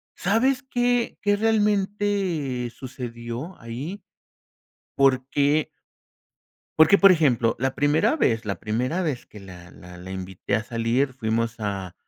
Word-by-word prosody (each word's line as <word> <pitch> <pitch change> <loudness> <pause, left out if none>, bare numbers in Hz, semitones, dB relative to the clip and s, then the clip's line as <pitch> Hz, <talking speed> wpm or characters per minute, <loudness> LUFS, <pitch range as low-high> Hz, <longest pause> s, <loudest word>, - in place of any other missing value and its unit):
¿sabes 235 +7 +1
qué 245 -1 0
qué 205 0 +2
realmente 200 - 0
sucedió 120 +4 -7
ahí? 135 - -7 0.9
Porque 140 +3 +2 1.1
porque, 160 +6 +7
por 195 -1 +7
ejemplo, 125 -9 +2
la 130 +1 -1
primera 155 - +2
vez 115 - +1
la 100 - -3
primera 125 +11 -1
vez 145 -8 -3
que 105 - -13
la 90 -2 -12
la 90 0 -13
la 95 +1 -10
invité 95 +1 -4
a 110 - -3
salir 120 +4 0
fuimos 115 -1 -2
a 100 -3 -4
135 Hz, 125 wpm, -24 LUFS, 115-190 Hz, 1.1 s, porque